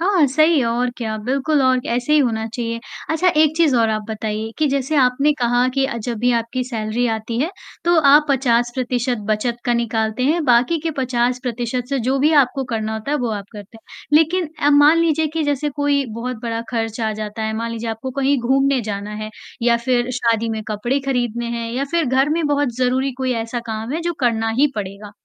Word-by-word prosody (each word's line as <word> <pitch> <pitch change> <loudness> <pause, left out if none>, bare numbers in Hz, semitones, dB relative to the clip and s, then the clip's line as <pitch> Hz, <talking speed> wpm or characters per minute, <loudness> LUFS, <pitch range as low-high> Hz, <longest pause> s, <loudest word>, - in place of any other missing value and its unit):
हाँ, 360 -3 +3
सही 310 +4 +3
है 260 - +2
और 240 +2 0
क्या 220 -2 -3
बिल्कुल 275 +4 +1
और 260 -1 +3
ऐसे 245 +5 0
ही 305 - +6
होना 225 -5 0
चाहिए, 230 -1 -3 0.3
अच्छा 325 +3 +2
एक 310 0 +3
चीज़ 325 -5 +3
और 230 -1 +3
आप 215 0 -1
बताइए 220 0 -3
कि 310 - +2
जैसे 275 +2 -1
आपने 275 +2 +3
कहा 245 +1 +2
कि 270 -1 +2
अ, 270 - -4
जब 230 0 -4
भी 245 +3 +2
आपकी 235 +2 -1
सैलरी 230 0 -2
आती 220 +1 -4
है, 315 +5 0 0.3
तो 345 +1 +3
आप 295 +1 +6
50% 245 -1 0
बचत 220 +3 0
का 240 - +1
निकालते 225 0 -1
हैं 315 +4 +1
बाकी 250 +5 +3
के 325 - -2
50% 245 -1 -1
से 275 -1 0
जो 260 +4 0
भी 300 +4 +3
आपको 265 +1 -3
करना 220 -3 -3
होता 220 +5 -5
है, 295 - +2
वो 245 -3 -1
आप 205 -2 -4
करते 205 +1 -11
हैं, - - -53 0.3
लेकिन 330 +2 +1
अ, 290 - +3
मान 295 +3 +6
लीजिए 320 -1 +2
कि 325 - 0
जैसे 290 0 0
कोई 285 -1 +1 0.2
बहुत 250 0 -3
बड़ा 230 -1 -2
खर्च 225 -1 -2
आ 220 -1 0
जाता 215 +1 -5
है, 220 0 -1
मान 230 +1 -3
लीजिए 230 0 -4
आपको 225 +4 -5
कहीं 275 0 +2
घूमने 270 +2 +2
जाना 205 -2 -5
है 215 - -6 0.3
या 235 0 +4
फ़िर 240 +1 0
शादी 230 -2 +1
में 220 -1 -3
कपड़े 240 +6 -1
खरीदने 240 -3 -1
हैं 230 0 -4
या 265 +3 -1
फ़िर 340 -2 +1
घर 265 +3 +2
में 325 +1 0
बहुत 290 -4 0
ज़रूरी 260 +2 +1
कोई 260 -1 0
ऐसा 230 +1 -4
काम 220 +2 -4
है 320 - -2
जो 345 0 -1
करना 225 -2 +1
ही 290 - +6
पड़ेगा, 200 0 -6
245 Hz, 215 wpm, -20 LUFS, 230-280 Hz, 0.3 s, ही